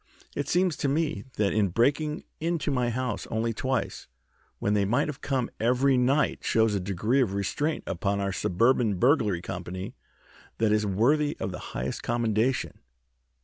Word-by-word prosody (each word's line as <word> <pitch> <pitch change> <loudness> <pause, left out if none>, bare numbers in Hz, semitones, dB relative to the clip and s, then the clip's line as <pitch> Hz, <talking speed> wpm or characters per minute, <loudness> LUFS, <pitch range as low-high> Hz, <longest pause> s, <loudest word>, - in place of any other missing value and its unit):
It 145 - -2
seems 180 -2 +2
to - - -1
me 140 -7 -1
that 105 -2 +1
in 105 -2 +3
breaking 145 - +1 0.2
into 165 -2 -1
my 125 -3 +1
house 125 -2 -3
only 115 +1 -1
twice 130 +1 -2 0.5
when 105 - 0
they 105 -1 +3
might 125 +10 +1
have 145 -3 -6
come 130 -4 -1
every 125 +4 +3
night 130 +4 +2
shows 110 -1 +2
a 100 - +1
degree 100 +8 +1
of 100 -6 0
restraint 145 - -1
upon 100 +3 -1
our 100 -1 -1
Suburban 110 +3 +2
Burglary 105 - +2
Company 95 0 -5 0.6
that 110 -1 +2
is 105 0 +2
worthy 145 +10 +2
of 95 - -2
the 90 - -6 0.2
highest 60 +2 -3
commendation. 120 +1 0
115 Hz, 160 wpm, -27 LUFS, 100-140 Hz, 0.6 s, in